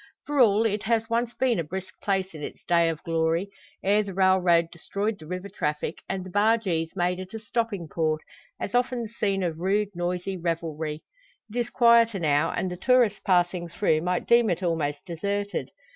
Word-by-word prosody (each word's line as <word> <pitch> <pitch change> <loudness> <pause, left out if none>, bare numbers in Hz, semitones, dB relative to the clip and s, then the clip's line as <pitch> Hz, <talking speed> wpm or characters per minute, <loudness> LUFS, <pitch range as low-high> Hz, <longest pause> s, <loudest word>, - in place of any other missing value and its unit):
For 290 -1 -1
all, 220 -2 +5
it 210 -1 0
has 225 0 0
once 235 +1 0
been 250 -7 +1
a - - 0
brisk 185 +4 -6
place 195 -2 -1
in 155 - -9
its - - -7
days 170 -1 +3
of 155 - -14
glory; 165 +3 0 0.3
ere 205 +2 +4
the 200 -3 -6
railroad 185 -3 +4
destroyed 200 +5 -3
the 155 - -11
river 180 +3 -5
traffic, 150 -4 -3
and 190 -1 -2
the 185 - -9
bargees 205 -6 +1
made 180 0 0
it 185 +3 -8
a - - -4
stopping 215 -5 -2
port, 155 0 0 0.4
as - - -4
often 245 0 +1
the 220 - -6
scene 200 -3 -1
of 165 -2 -2
rude, 200 +3 +1
noisy 180 +2 -2
revelry. 160 -3 -3 0.5
It - - -4
is 240 -1 0
quieter 235 -3 +5
now, 150 -2 +2
and 185 - -2
the 180 - -5
tourist 240 -1 +3
passing 175 -1 +1
through 160 -3 +1
might 180 +1 -1
deem 235 -2 +5
it 180 +1 -1
almost 150 -4 -1
deserted. 200 +4 -3
185 Hz, 190 wpm, -26 LUFS, 170-210 Hz, 0.5 s, all